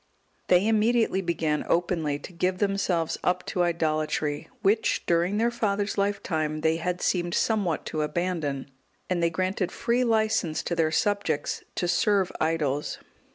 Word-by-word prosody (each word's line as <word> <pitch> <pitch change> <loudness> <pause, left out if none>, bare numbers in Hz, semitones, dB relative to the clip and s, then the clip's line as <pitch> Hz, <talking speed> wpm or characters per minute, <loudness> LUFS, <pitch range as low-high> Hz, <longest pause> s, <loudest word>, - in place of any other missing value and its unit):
They 180 +3 +4
immediately 225 -2 +2
began 160 -4 -1
openly 165 -4 +1
to 180 - -11
give 180 +2 0
themselves 195 -4 0
up 180 0 0
to 180 - -1
idolatry, 155 -3 0
which, 210 +3 +2
during 175 +4 +2
their 235 +2 +2
father's 205 -3 -1
lifetime, 160 -7 -1
they 160 +1 +2
had 180 +2 -2
seemed 175 -1 0
somewhat 200 -8 0
to 155 - -2
abandon, 150 -4 -2 0.4
and 175 -1 +1
they 170 - +3
granted 185 +2 -1
free 240 +1 +1
licence 220 -8 +1
to 170 - -2
their 165 -1 +2
subjects 200 -5 0
to 175 - -1
serve 200 0 +2
idols. 150 -3 0
175 Hz, 145 wpm, -26 LUFS, 160-200 Hz, 0.4 s, They